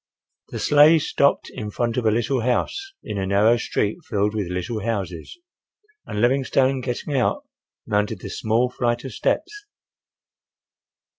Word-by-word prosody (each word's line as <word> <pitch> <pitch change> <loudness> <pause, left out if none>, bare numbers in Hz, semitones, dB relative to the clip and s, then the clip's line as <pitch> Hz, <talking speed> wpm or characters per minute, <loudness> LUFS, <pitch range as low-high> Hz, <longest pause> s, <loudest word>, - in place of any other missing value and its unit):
The - - -6
sleigh 150 +3 +6
stopped 140 -2 +1
in 105 - -5
front 115 +2 -2
of 120 -3 0
a - - +4
little 120 +3 0
house, 390 - -1
in 100 - -4
a 95 - -2
narrow 105 +4 +4
street 110 - -1
filled 105 -6 0
with 105 -4 -2
little 90 +6 -3
houses, 95 - -4 0.7
and 105 - -4
Livingstone 130 +2 +2
getting 125 +3 -3
out 130 - +1 0.4
mounted 105 0 -1
the - - -6
small 115 +3 0
flight 120 -1 -1
of 135 - -6
steps. 415 0 -2
120 Hz, 145 wpm, -23 LUFS, 105-135 Hz, 0.7 s, sleigh